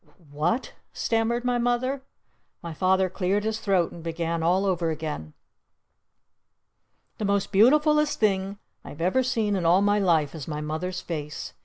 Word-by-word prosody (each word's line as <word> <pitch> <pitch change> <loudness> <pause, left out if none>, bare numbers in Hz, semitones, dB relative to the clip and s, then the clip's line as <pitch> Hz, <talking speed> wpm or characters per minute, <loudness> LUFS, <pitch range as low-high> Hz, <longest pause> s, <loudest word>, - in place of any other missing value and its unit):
"W 175 - -27
what?" 165 - -1 0.2
stammered 230 +1 0
my 245 -1 +1
Mother. 245 +3 0 0.6
My 170 -1 -5
Father 185 +3 +2
cleared 190 +3 -1
his 220 0 -2
throat 190 -6 +1
and 170 - -10
began 165 0 -2
all 180 +4 +2
over 175 -3 0
again. 150 - -5 1.9
The 215 - -1
most 200 0 0
beautifulest 300 +8 +4
thing 195 -2 +1 0.3
I've 145 - -10
ever 185 +10 +2
seen 225 -5 0
in 185 - -1
all 175 +4 +4
my 205 0 +3
life 165 -7 +2
is 155 -5 -7
my 150 -2 -4
Mother's 160 +4 -4
face! 150 -3 -6
190 Hz, 155 wpm, -25 LUFS, 165-220 Hz, 1.9 s, beautifulest